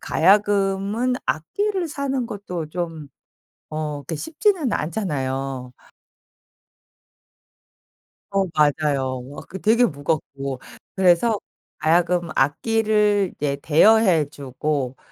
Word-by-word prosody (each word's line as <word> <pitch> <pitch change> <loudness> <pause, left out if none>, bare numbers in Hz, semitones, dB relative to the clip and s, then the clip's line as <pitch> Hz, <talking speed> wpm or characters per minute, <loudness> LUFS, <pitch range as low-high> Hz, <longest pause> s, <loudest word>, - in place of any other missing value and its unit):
가야금은 200 +5 +2
악기를 375 - -1
사는 270 -4 -2
것도 180 -7 -5
좀 165 -3 -5 0.6
어 150 -2 -4
그렇게 165 - -4
쉽지는 320 - 0
않잖아요. 135 - -3 2.6
어 195 0 +2
맞아요. 145 -3 +1
어 145 - -8
그 190 - -8
되게 230 +3 +4
무겁고. 140 - -3 0.4
그래서 190 +4 +3 0.4
'가야금 170 +1 +2
악기를 210 +5 +2
이제 140 -1 -1
대여해 180 +1 +5
주고 140 -2 -3
170 Hz, 200 characters per minute, -22 LUFS, 145-215 Hz, 2.6 s, 대여해